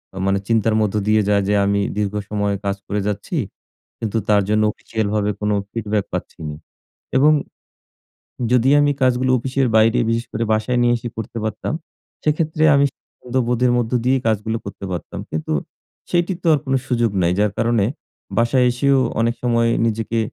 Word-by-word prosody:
এ -, -, -8 dB
মানে 95 Hz, 0 st, +2 dB
চিন্তার 115 Hz, -1 st, +2 dB
মধ্য 105 Hz, -1 st, 0 dB
দিয়ে 110 Hz, 0 st, +4 dB
যায়। 100 Hz, -1 st, +3 dB
যে 105 Hz, -, +2 dB
আমি 100 Hz, 0 st, +1 dB, 0.2 s
দীর্ঘ 105 Hz, -1 st, -1 dB, 0.2 s
সময় 105 Hz, -1 st, 0 dB
কাজ 100 Hz, 0 st, 0 dB
করে 105 Hz, -, -1 dB
যাচ্ছি। 105 Hz, -, -3 dB, 0.6 s
কিন্তু 110 Hz, 0 st, -2 dB
তার 105 Hz, -1 st, +5 dB
জন্য 105 Hz, 0 st, +3 dB
অফিসিয়াল 110 Hz, -2 st, -3 dB
ভাবে 105 Hz, -1 st, +1 dB
কোন 105 Hz, 0 st, 0 dB, 0.2 s
ফিডব্যাক 105 Hz, -3 st, -1 dB
পাচ্ছি -, -, -5 dB
না। 75 Hz, -, -6 dB, 0.6 s
এবং 145 Hz, +4 st, +6 dB, 1.2 s
যদি 125 Hz, +1 st, +4 dB
আমি 145 Hz, 0 st, +3 dB
কাজগুলো 130 Hz, 0 st, +2 dB
অফিসের 130 Hz, +2 st, 0 dB
বাইরে 110 Hz, +1 st, +4 dB
বিশেষ 115 Hz, +1 st, 0 dB
করে 115 Hz, -, -1 dB
বাসায় 110 Hz, +3 st, 0 dB
নিয়ে 120 Hz, 0 st, +4 dB
এসে 120 Hz, +1 st, -6 dB
করতে 115 Hz, +1 st, -5 dB
পারতাম, 110 Hz, +6 st, -3 dB, 0.5 s
সেক্ষেত্রে 155 Hz, +1 st, 0 dB
আমি 140 Hz, 0 st, +4 dB, 0.6 s
বোধের 125 Hz, +1 st, +2 dB
মধ্য 115 Hz, -2 st, -1 dB
দিয়েই 130 Hz, +1 st, +2 dB
কাজগুলো 110 Hz, +1 st, 0 dB
করতে 100 Hz, 0 st, -7 dB
পারতাম। 90 Hz, -, -5 dB
কিন্তু 80 Hz, 0 st, -2 dB, 0.6 s
সেটির 175 Hz, +1 st, 0 dB
তো -, -, -1 dB
আর 150 Hz, -, +2 dB
কোন 135 Hz, -, -1 dB
সুযোগ 120 Hz, -3 st, +1 dB
নাই। 85 Hz, 0 st, +2 dB
যার 105 Hz, 0 st, +2 dB
কারণে 115 Hz, -3 st, +2 dB, 0.5 s
বাসায় 120 Hz, +2 st, +3 dB
এসেও 135 Hz, +2 st, +2 dB, 0.2 s
অনেক 115 Hz, +1 st, +1 dB
সময় 115 Hz, -1 st, +2 dB, 0.2 s
নিজেকে 115 Hz, 0 st, -1 dB
115 Hz, 170 wpm, -20 LUFS, 105-125 Hz, 1.2 s, এবং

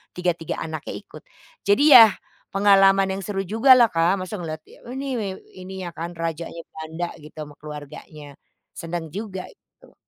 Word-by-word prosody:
tiga 180 Hz, 0 st, +1 dB
tiga 165 Hz, -, -5 dB
anaknya 155 Hz, -2 st, -5 dB
ikut. -, -, -12 dB, 0.4 s
Jadi 205 Hz, +8 st, +4 dB
yah 225 Hz, -5 st, +10 dB, 0.4 s
pengalaman 195 Hz, -1 st, +4 dB
yang 190 Hz, -, -3 dB
seru 195 Hz, 0 st, -3 dB
jugalah, 230 Hz, +4 st, +5 dB
Kak, 170 Hz, +3 st, +2 dB
masa 185 Hz, +1 st, -6 dB
ngelihat, 155 Hz, -2 st, -6 dB, 0.2 s
oh 250 Hz, -, -7 dB
ini 275 Hz, +1 st, -4 dB
wew 195 Hz, -2 st, -4 dB, 0.2 s
ininya 185 Hz, -1 st, -7 dB
kan 170 Hz, +1 st, -7 dB
rajanya 165 Hz, 0 st, -5 dB
Belanda 160 Hz, +2 st, -5 dB
gitu 150 Hz, +1 st, -14 dB
ama 145 Hz, 0 st, -12 dB
keluarganya. 150 Hz, 0 st, -10 dB, 0.5 s
Senang 165 Hz, -2 st, -6 dB
juga 195 Hz, -2 st, -6 dB
gitu. -, -, -24 dB
180 Hz, 155 wpm, -23 LUFS, 165-200 Hz, 0.5 s, yah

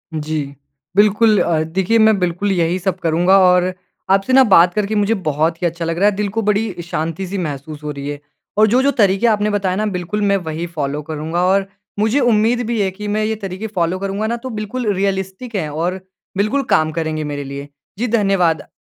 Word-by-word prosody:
जी। 155 Hz, 0 st, -2 dB, 0.5 s
बिल्कुल 210 Hz, +1 st, +4 dB
अ, 160 Hz, -2 st, +1 dB
देखिए 190 Hz, +7 st, 0 dB
मैं 220 Hz, -1 st, +5 dB
बिल्कुल 180 Hz, +3 st, 0 dB
यही 175 Hz, -1 st, +1 dB
सब 185 Hz, 0 st, -2 dB
करूँगा 175 Hz, +3 st, +3 dB
और 180 Hz, 0 st, +4 dB, 0.4 s
आपसे 195 Hz, +6 st, +2 dB
ना 265 Hz, -, +8 dB
बात 180 Hz, -6 st, +5 dB
करके 210 Hz, 0 st, -1 dB
मुझे 205 Hz, +2 st, +2 dB
बहुत 160 Hz, +3 st, 0 dB
ही 175 Hz, -, +2 dB
अच्छा 170 Hz, 0 st, -4 dB
लग 165 Hz, 0 st, -2 dB
रहा 205 Hz, +3 st, +4 dB
है 205 Hz, -, -4 dB
दिल 205 Hz, 0 st, -1 dB
को -, -, +3 dB
बड़ी 210 Hz, -3 st, -1 dB
शांति 165 Hz, +2 st, -3 dB
सी 195 Hz, +2 st, -4 dB
महसूस 150 Hz, -2 st, -5 dB
हो 150 Hz, -, -3 dB
रही 140 Hz, 0 st, -6 dB
है। 145 Hz, -, -5 dB, 0.4 s
और 215 Hz, -, +6 dB
जो-जो 260 Hz, +6 st, +3 dB
तरीक़े 200 Hz, -2 st, +2 dB
आपने 210 Hz, -1 st, +2 dB
बताए 195 Hz, -3 st, 0 dB
ना 215 Hz, +2 st, -1 dB
बिल्कुल 200 Hz, +1 st, -3 dB
मैं 200 Hz, -1 st, +2 dB
वही 160 Hz, -1 st, -4 dB
फ़ॉलो 150 Hz, -3 st, -3 dB
करूँगा। 160 Hz, +3 st, -3 dB
और 195 Hz, +1 st, +2 dB, 0.3 s
मुझे 220 Hz, +6 st, +2 dB
उम्मीद 235 Hz, -1 st, +2 dB
भी 230 Hz, -2 st, 0 dB
है 195 Hz, -, +1 dB
कि 210 Hz, +2 st, -7 dB
मैं 215 Hz, +1 st, 0 dB
ये 220 Hz, +1 st, -1 dB
तरीक़े 195 Hz, 0 st, -6 dB
फ़ॉलो 175 Hz, +1 st, 0 dB
करूँगा 200 Hz, +2 st, -2 dB
ना 235 Hz, +1 st, -1 dB
तो 260 Hz, +2 st, -7 dB
बिल्कुल 215 Hz, +1 st, -3 dB
रियलिस्टिक 195 Hz, +4 st, -3 dB
है 165 Hz, -6 st, -1 dB
और 175 Hz, +4 st, -2 dB, 0.4 s
बिल्कुल 235 Hz, +8 st, +1 dB
काम 155 Hz, 0 st, +3 dB
करेंगे 155 Hz, -1 st, -2 dB
मेरे 145 Hz, -1 st, -4 dB
लिए। 140 Hz, +1 st, -7 dB, 0.3 s
जी 245 Hz, +3 st, -1 dB
धन्यवाद 195 Hz, -8 st, +1 dB
190 Hz, 205 wpm, -18 LUFS, 165-210 Hz, 0.5 s, ना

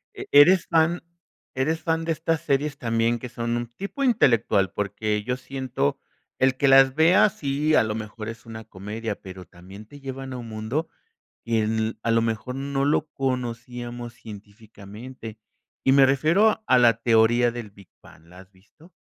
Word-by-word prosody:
E -, -, -7 dB
eres 170 Hz, +6 st, +6 dB
fan 165 Hz, +2 st, +2 dB, 0.5 s
eres 155 Hz, +5 st, -1 dB
fan 165 Hz, 0 st, -1 dB
de 165 Hz, -, 0 dB
estas 160 Hz, 0 st, -1 dB
series 140 Hz, +1 st, -1 dB
también 115 Hz, 0 st, 0 dB
que 125 Hz, -, -7 dB
son 120 Hz, 0 st, -3 dB
un 120 Hz, -, -3 dB
tipo 200 Hz, -, -5 dB
intelectual, 115 Hz, -, +2 dB
porque 105 Hz, +1 st, -2 dB
yo 125 Hz, +2 st, -2 dB
siento 130 Hz, -, -3 dB, 0.4 s
el 130 Hz, 0 st, +2 dB
que 140 Hz, +1 st, +2 dB
las 135 Hz, 0 st, +6 dB
veas 170 Hz, +7 st, +4 dB
sí, 145 Hz, +2 st, 0 dB
a -, -, +5 dB
lo 110 Hz, 0 st, -3 dB
mejor 110 Hz, 0 st, -7 dB
es 115 Hz, +1 st, -9 dB
una 110 Hz, -1 st, -9 dB
comedia, 105 Hz, +3 st, -6 dB
pero 95 Hz, -1 st, -10 dB
también 95 Hz, +5 st, -14 dB
te 145 Hz, +6 st, -14 dB
llevan 135 Hz, 0 st, -7 dB
a -, -, -5 dB
un 115 Hz, -1 st, -8 dB
mundo 110 Hz, +9 st, -3 dB, 0.6 s
que 110 Hz, -1 st, 0 dB
a 115 Hz, -, -1 dB
lo 115 Hz, 0 st, +3 dB
mejor 115 Hz, +3 st, -3 dB
no 135 Hz, 0 st, -2 dB
lo 150 Hz, +2 st, +1 dB
conocíamos 120 Hz, -2 st, -4 dB
científicamente. 110 Hz, +2 st, -11 dB, 0.5 s
Y 135 Hz, -, +4 dB
me 135 Hz, -1 st, +6 dB
refiero 170 Hz, +12 st, +2 dB
a 130 Hz, -, +5 dB
la 120 Hz, -2 st, +5 dB
teoría 120 Hz, +1 st, +3 dB
del 115 Hz, -3 st, -7 dB
Big 100 Hz, -2 st, -18 dB
Bang, 80 Hz, -, -18 dB
¿la 90 Hz, +2 st, -15 dB
has 95 Hz, 0 st, -17 dB
visto? 100 Hz, -, -22 dB
120 Hz, 175 wpm, -24 LUFS, 110-140 Hz, 0.6 s, eres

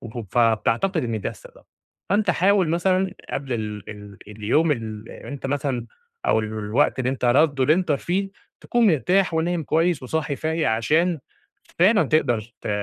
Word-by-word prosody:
وف 115 Hz, -1 st, -5 dB
فبتعتقد 120 Hz, -, +2 dB
إن 115 Hz, -3 st, -2 dB
ده -, -, -3 dB
السبب. -, -, -15 dB, 0.5 s
فأنت 205 Hz, -1 st, +2 dB
حاول 190 Hz, 0 st, +3 dB
مثلًا 185 Hz, +3 st, +1 dB, 0.2 s
قبل 135 Hz, -1 st, -4 dB
ال 105 Hz, -4 st, -4 dB
ال 105 Hz, -2 st, -11 dB
اليوم 110 Hz, +10 st, +1 dB
اللي 110 Hz, -3 st, -7 dB
أنت 140 Hz, -2 st, -5 dB
مثلًا 135 Hz, -4 st, -2 dB, 0.4 s
أو -, -, +3 dB
ال 110 Hz, -, -3 dB
الوقت 110 Hz, +3 st, 0 dB
اللي 130 Hz, 0 st, 0 dB
أنت 130 Hz, -1 st, -4 dB
رد 140 Hz, +3 st, +3 dB
اللي 150 Hz, +4 st, +5 dB
أنت 180 Hz, -4 st, 0 dB
فيه، 185 Hz, +7 st, -1 dB, 0.3 s
تكون 240 Hz, -2 st, +2 dB
مرتاح 180 Hz, -, +2 dB
ونايم 165 Hz, +1 st, 0 dB
كويس 165 Hz, 0 st, +1 dB
وصاحي 145 Hz, +1 st, -2 dB
فايق 160 Hz, -3 st, 0 dB
عشان 155 Hz, +10 st, +1 dB, 0.6 s
فعلًا 195 Hz, +4 st, +5 dB
تقدر 135 Hz, -6 st, +1 dB, 0.2 s
ت -, -, -5 dB
145 Hz, 160 wpm, -23 LUFS, 115-175 Hz, 0.6 s, اللي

